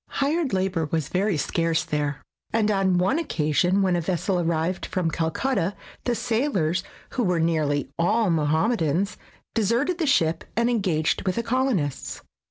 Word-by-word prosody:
Hired 290 +1 +1
labor 185 -4 0
was 160 -3 -1
very 190 -1 +1
scarce 165 +1 0
there, 150 -3 -2 0.3
and 215 -1 +2
on 190 -2 +2
one 190 - +2
occasion 180 - +1
when 185 -2 +2
a 175 - 0
vessel 180 +2 0
arrived 170 +1 -1
from 175 -3 -1
Calcutta, 180 +4 -1 0.3
the 245 - +1
sailors, 220 - 0 0.3
who 250 - -1
were 180 -4 +1
nearly 155 -4 +1
all 210 +3 +2
Mohammedans, 165 +4 +1 0.4
deserted 235 - +1
the 320 - +1
ship 165 - +2
and 235 +1 +2
engaged 180 -9 +1
with 185 - +1
the 235 - -1
colonists. 230 - -1
185 Hz, 150 wpm, -25 LUFS, 160-230 Hz, 0.4 s, and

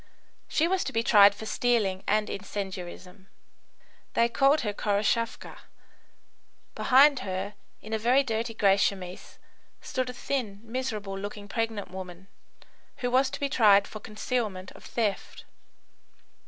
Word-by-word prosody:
She 320 - +1
was 380 +1 +1
to - - -3
be 225 0 0
tried 200 -3 +7
for 220 - -8
stealing 215 -6 0
and 215 0 +2
incendiarism. 190 -1 -7 0.9
They 235 0 +3
called 275 +5 +3
her 210 -3 -2
Khoroshavka. 210 +3 -1 1.1
Behind 275 +1 +5
her, 190 +2 -4 0.3
in 220 - -7
a 220 - 0
very 250 +5 +3
dirty 225 -2 -3
grey 200 -2 +4
chemise, 190 -2 -3 0.4
stood 255 -1 -3
a - - -5
thin, 240 -6 -3
miserable 225 -5 -4
looking 205 +1 -7
pregnant 225 -1 -3
woman, 185 0 -9 0.8
who 245 - 0
was 260 +1 +3
to - - -6
be 280 - 0
tried 205 -6 +5
for 215 - -8
concealment 215 -3 -3
of - - -15
theft. 215 -4 -3
215 Hz, 135 wpm, -27 LUFS, 195-245 Hz, 1.1 s, tried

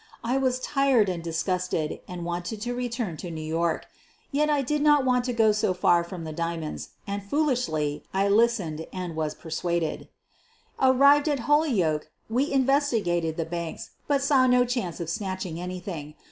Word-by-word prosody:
I 245 +3 0
was 255 -1 +1
tired 270 -7 +2
and 175 -2 -3
disgusted 165 -1 -1
and 175 -1 -6
wanted 175 +5 -4
to 240 +2 -2
return 235 -8 -3
to 175 - -6
New 160 -1 -6
York. 165 +1 0 0.5
Yet 300 +2 +2
I 290 -2 +2
did 295 +3 0
not 295 -2 +5
want 250 -1 +2
to 250 - 0
go 225 -2 +4
so 210 -3 +1
far 175 -1 +3
from 170 -1 -7
the 155 -1 -5
diamonds, 165 -1 -4 0.2
and, 200 0 -3
foolishly, 200 - 0
I 195 +1 +1
listened 200 -7 +2
and 180 -3 -5
was 155 -1 -2
persuaded. 170 0 -2 0.7
Arrived 280 +3 +5
at 285 -4 0
Holyoke 215 - +2 0.2
we 260 +5 +1
investigated 235 - +1
the 165 - -1
banks, 170 0 -5 0.2
but 280 -1 +2
saw 275 -2 +4
no 250 0 +4
chance 240 -9 -3
of 170 - -4
snatching 185 -2 -4
anything. 180 -4 -6
195 Hz, 165 wpm, -26 LUFS, 170-255 Hz, 0.7 s, not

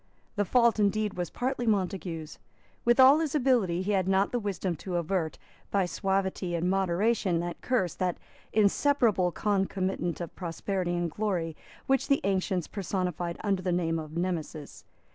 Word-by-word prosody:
The 205 -1 +1
fault 235 0 +3
indeed 210 0 +1
was 175 -2 -3
partly 245 -1 -2
Montague's. 180 -6 -2 0.4
With 240 +2 +3
all 265 +4 +8
his 315 -3 -1
ability, 235 - +2
he 205 - -1
had 190 -2 +1
not 195 +1 +2
the 245 - 0
wisdom 195 -4 -2
to 180 +3 -5
avert, 165 -4 -1 0.3
by 195 -2 +2
suavity 190 0 -1
and 170 +1 0
moderation, 190 0 +1
that 175 0 -5
curse, 215 -9 0
the 180 -2 -1 0.4
inseparable 215 -3 +3
concomitant 190 -3 -1
of 170 -2 -6
prosperity 180 +1 -2
and 175 -1 -1
glory, 175 -5 -2 0.3
which 270 0 +1
the 275 - +3
ancients 190 -2 0
personified 180 -3 -3
under 195 -3 +1
the 185 -1 -1
name 165 -2 0
of 155 +1 -7
Nemesis. 165 -4 -4
190 Hz, 155 wpm, -28 LUFS, 175-210 Hz, 0.4 s, all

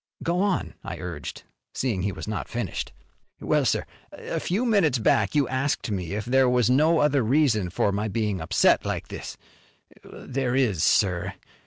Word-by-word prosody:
"Go 175 +2 0
on," 200 -2 0
I - - -6
urged, 85 -5 -7 0.3
seeing 115 -8 -1
he 100 +2 -1
was 95 - -8
not 105 - -3
finished. 120 -6 -4 0.5
"Well, - - +1
sir, - - +1 0.3
a - - -5
few 205 +8 -1
minutes 195 - +3
back 110 +1 +2
you 145 -3 +3
asked 130 -3 -1
me 95 -2 -3
if 105 0 -3
there 130 +1 +3
was 125 -1 +3
no 155 +5 +4
other 145 -3 +3
reason 115 -6 +2
for 100 +3 0
my 105 +2 -1
being 105 -3 -1
upset 80 - +3
like. - - -4 0.9
There 130 -1 -3
is, 110 -11 +1
sir. 90 +1 +2
120 Hz, 165 wpm, -25 LUFS, 100-140 Hz, 0.9 s, no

